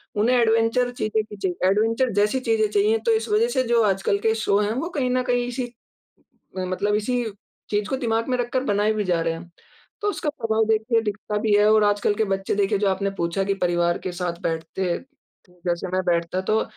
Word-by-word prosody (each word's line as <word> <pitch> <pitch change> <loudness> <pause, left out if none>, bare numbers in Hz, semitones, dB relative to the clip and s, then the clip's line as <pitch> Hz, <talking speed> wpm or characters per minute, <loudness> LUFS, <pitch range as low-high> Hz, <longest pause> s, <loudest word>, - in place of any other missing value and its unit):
उन्हें 235 +4 +3
एडवेंचर 230 +2 +2
चीज़ें 215 -2 -1
की 210 -1 -11
चाहिए 185 -1 -1
एडवेंचर 225 +5 +2
जैसी 210 +6 +2
चीज़ें 440 - +2
चाहिए 420 +2 +3
तो - - +5
इस 440 - -2
वजह 430 +2 +3
से 260 - +1
जो 235 -1 +3
आजकल 195 0 +1
के 220 +1 +2
शो 205 -2 +1
है 210 +1 0
वो 320 +8 -3
कहीं 255 -1 +1
न 255 0 +1
कहीं 245 0 +1
इसी 245 0 -4 0.9
म 185 - -2
मतलब 205 +3 0
इसी 245 +3 0 0.5
चीज़ 205 0 0
को 265 - 0
दिमाग 230 -1 -1
में 250 -1 0
रखकर 245 +2 -1
बनाए 210 -1 +2
भी 210 - -1
जा 175 -3 +1
रहे 165 0 0
हैं। 170 +1 -10 0.5
तो 415 - +1
उसका 315 - -4
प्रभाव 225 -6 0
देखिए 225 +1 +2
दिखता 210 0 -3
भी 215 0 0
है 205 0 +4
और 215 -1 +5
आजकल 205 0 +2
के 220 - +1
बच्चे 195 0 -1
देखिए 205 0 +1
जो 200 0 +1
आपने 195 +1 0
पूछा 170 +3 0
कि 195 - 0
परिवार 175 -2 +1
के 185 - -2
साथ 175 -1 -4
बैठते 165 +3 -3 0.8
जैसे 175 +1 -1
मैं 185 - +1
बैठता 170 +1 0
तो, 215 +4 +1
215 Hz, 215 wpm, -23 LUFS, 195-245 Hz, 0.9 s, तो